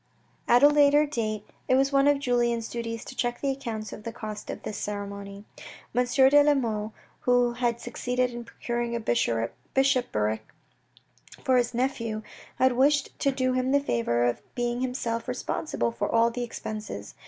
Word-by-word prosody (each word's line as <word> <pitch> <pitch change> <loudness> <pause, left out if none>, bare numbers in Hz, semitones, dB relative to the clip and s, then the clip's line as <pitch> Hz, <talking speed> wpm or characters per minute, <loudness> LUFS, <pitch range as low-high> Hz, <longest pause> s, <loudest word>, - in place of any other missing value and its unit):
At 245 +3 +5
a - - +11
later 290 0 +5
date, 215 -7 -3 0.2
it 255 - +4
was 270 +1 +3
one 275 0 +4
of 290 0 +5
Julien's 240 -4 0
duties 230 -1 -5
to 260 - -9
check 240 -1 -1
the 275 - 0
accounts 225 -6 -5
of - - -8
the 230 - -5
cost 215 -2 -7
of - - -6
this 210 -1 -5
ceremony. 200 0 -6 0.5
M. 250 +1 +2
de 270 +3 +6
la 295 0 +4
Mole, 220 -4 -2 0.3
who 245 -1 +3
had 240 -1 -1
succeeded 250 +1 -1
in 240 0 -6
procuring 235 0 -3
a - - -1
bishopric 115 - 0 1.0
for 260 -3 +3
his 245 -1 +1
nephew, 230 -4 -1 0.3
had 260 0 +4
wished 280 +3 +3
to 275 - +2
do 255 -1 0
him 255 +1 0
the 285 - +5
favour 120 - 0
of 120 -1 0
being 240 0 -1
himself 240 -3 -2
responsible 120 - -2
for 115 - -2
all 230 +1 +4
the 245 +1 -4
expenses. 215 - -6
240 Hz, 170 wpm, -27 LUFS, 215-260 Hz, 1.0 s, a